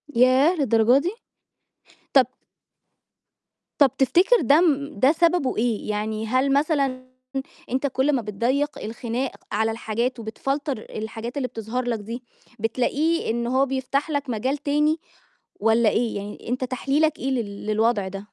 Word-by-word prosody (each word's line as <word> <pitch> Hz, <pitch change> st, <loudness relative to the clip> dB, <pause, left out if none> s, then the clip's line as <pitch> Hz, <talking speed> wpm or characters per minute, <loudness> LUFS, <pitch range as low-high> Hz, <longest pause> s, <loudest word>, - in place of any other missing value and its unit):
ياه! 255 Hz, +8 st, +5 dB
للدرجة 235 Hz, -3 st, +4 dB
دي! 350 Hz, -, -1 dB, 1.0 s
طَب 265 Hz, -3 st, +6 dB, 1.5 s
طَب 275 Hz, -4 st, +6 dB
تفتكر 360 Hz, -, +4 dB
ده 290 Hz, +4 st, +5 dB
م 295 Hz, -3 st, 0 dB
ده 265 Hz, +2 st, +6 dB
سببه 335 Hz, -3 st, +2 dB
إيه؟ 225 Hz, -2 st, -1 dB
يعني 215 Hz, +1 st, -2 dB
هل 260 Hz, +3 st, +2 dB
مثلًا 275 Hz, -3 st, +1 dB, 0.7 s
أنت 260 Hz, +3 st, 0 dB
كلّ 270 Hz, +2 st, +1 dB
ما 255 Hz, -, +1 dB
بتضيّق 250 Hz, +8 st, -1 dB
الخناق 235 Hz, +3 st, -3 dB, 0.2 s
على 220 Hz, +2 st, +1 dB
الحاجات 230 Hz, +2 st, -2 dB
وبتفلتر 270 Hz, +4 st, -3 dB
الحاجات 225 Hz, +3 st, -6 dB
اللي 255 Hz, -3 st, -1 dB
بتظهَر 230 Hz, +2 st, -4 dB
لك 235 Hz, -2 st, -1 dB
دي، 230 Hz, +4 st, -7 dB, 0.4 s
بتلاقيه 255 Hz, +7 st, 0 dB
إن 235 Hz, +1 st, -1 dB
هو 260 Hz, +3 st, +2 dB
بيفتَح 270 Hz, +3 st, -1 dB
لك 285 Hz, -3 st, -2 dB
مجال 255 Hz, +6 st, -1 dB
تاني 300 Hz, +2 st, +1 dB, 0.6 s
والّا 225 Hz, +1 st, +4 dB
إيه؟ 230 Hz, -2 st, 0 dB
يعني 205 Hz, +2 st, -7 dB
أنت 255 Hz, +1 st, -1 dB
تحليلك 275 Hz, +5 st, 0 dB
إيه 270 Hz, -, -2 dB
لل 210 Hz, -5 st, -3 dB
للوضع 215 Hz, -2 st, +1 dB
ده؟ 195 Hz, +1 st, -6 dB
255 Hz, 140 wpm, -24 LUFS, 225-280 Hz, 1.5 s, طَب